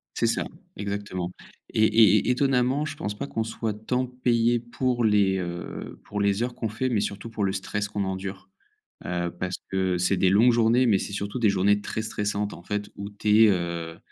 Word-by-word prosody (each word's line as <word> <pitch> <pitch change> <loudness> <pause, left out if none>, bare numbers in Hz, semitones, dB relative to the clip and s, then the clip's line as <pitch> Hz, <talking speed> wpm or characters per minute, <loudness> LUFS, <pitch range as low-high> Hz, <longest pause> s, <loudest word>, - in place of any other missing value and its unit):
C'est - - +2
ça, - - +1 0.3
exactement, 100 -3 -4 0.4
et 110 - +3
et 110 -2 +5
étonnamment, 130 +2 +2
je 155 - -5
pense 105 0 -4
pas - - -3
qu'on 115 -5 -2
soit 110 -1 -3
tant 125 +5 -1
payé 120 -1 +1
pour 120 +1 -1
les, 100 -3 +3
heu, 85 -1 -6
pour 105 0 -4
les 100 +3 +2
heures 125 0 -2
qu'on 115 - -3
fait, 120 +5 -2
mais 115 -4 +1
surtout 105 +3 -4
pour 105 -2 -2
le 95 - +1
stress 100 +2 -2
qu'on 100 -1 -2
endure, 95 0 -5 0.6
heu, 85 0 -2
parce 90 0 -2 0.2
que 95 -1 +1
c'est 90 +2 +1
des 95 - +4
longues 110 +6 +5
journées, 120 +2 +4
mais 105 -5 +4
c'est 100 - -5
surtout 100 +4 -3
des 110 -4 +4
journées 100 +1 +3
très 110 - -4
stressantes, 105 -1 -2
en - - -10
fait, 105 +2 -3
où 100 0 -6
tu 105 +2 +4
es, 110 - +6
heu 85 -3 -2
105 Hz, 205 wpm, -26 LUFS, 95-115 Hz, 0.6 s, es